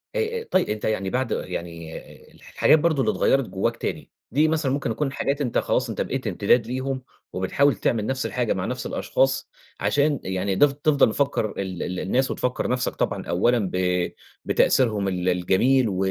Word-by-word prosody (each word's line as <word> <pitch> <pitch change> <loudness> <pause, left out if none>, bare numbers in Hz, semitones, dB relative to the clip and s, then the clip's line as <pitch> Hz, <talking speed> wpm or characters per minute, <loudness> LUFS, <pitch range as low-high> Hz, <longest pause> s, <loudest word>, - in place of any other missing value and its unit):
أأ 460 -1 -1
طيب 185 - +2
أنت 105 0 -3
يعني 95 -3 -1
بعد 130 +4 -1
يعني 85 -1 -5 0.4
الحاجات 155 - +2
برضو 160 -3 +2
اللي - - +2
اتغيرت 135 -2 +2
جواك 115 +4 -1
تاني، - - -5 0.2
دي 150 +5 +3
مثلًا 155 -4 0
ممكن 135 -2 -1
تكون 135 +5 -1
حاجات 140 +1 -1
أنت 125 -4 -1
خلاص - - +1
أنت - - -3
بقيت - - -3
امتداد 115 -2 +2
ليهم 130 +1 -3 0.3
وبتحاول 125 +9 +2
تعمل 105 +2 0
نفس 130 +2 -2
الحاجة - - 0
مع - - -3
نفس - - -4
الأشخاص - - 0 0.3
عشان 145 -1 +1
يعني 95 +1 -1
تف 145 +5 +5
تفضل 145 -4 +3
مفكر 135 -4 0
ال 95 -2 -3
ال 90 0 -4
الناس 130 +8 0
وتفكر 125 0 -1
نفسك 125 0 -1
طبعًا - - -2
أولًا 120 +7 +2
ب 90 -1 0 0.3
بتأثيرهم 105 -6 +2
ال 90 -1 0
الجميل 110 +8 +2
و 95 - -3
125 Hz, 175 wpm, -24 LUFS, 95-140 Hz, 0.4 s, تف